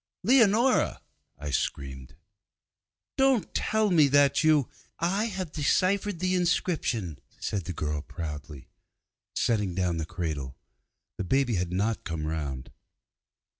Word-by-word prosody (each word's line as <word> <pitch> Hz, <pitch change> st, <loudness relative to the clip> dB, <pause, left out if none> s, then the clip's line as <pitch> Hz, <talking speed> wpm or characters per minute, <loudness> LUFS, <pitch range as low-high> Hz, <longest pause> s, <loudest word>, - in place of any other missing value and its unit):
'Leonora,' 235 Hz, +2 st, +4 dB, 0.4 s
I 75 Hz, -1 st, -5 dB
screamed, 65 Hz, -1 st, -3 dB, 1.0 s
'don't 265 Hz, -5 st, +2 dB
tell 215 Hz, -1 st, +1 dB
me 155 Hz, -5 st, +6 dB
that 140 Hz, +3 st, +4 dB
you 155 Hz, -4 st, +4 dB, 0.2 s
' -, -, -36 dB
'I 195 Hz, +6 st, +1 dB
have 190 Hz, -7 st, -4 dB
deciphered 190 Hz, +6 st, +1 dB
the 185 Hz, +2 st, 0 dB
inscription,' 165 Hz, -, 0 dB, 0.2 s
said 95 Hz, -5 st, -3 dB
the 90 Hz, -, -4 dB
girl 75 Hz, -1 st, -2 dB
proudly, 75 Hz, -4 st, -7 dB, 0.7 s
setting 105 Hz, -6 st, 0 dB
down 90 Hz, -2 st, 0 dB
the 80 Hz, -1 st, -3 dB
cradle. 70 Hz, -8 st, -4 dB, 0.6 s
The -, -, 0 dB
baby 130 Hz, +5 st, +1 dB
had 90 Hz, -3 st, -1 dB
not 105 Hz, +5 st, -1 dB
come 80 Hz, -4 st, -4 dB
round. 70 Hz, -5 st, -4 dB
110 Hz, 125 wpm, -28 LUFS, -, 1.0 s, me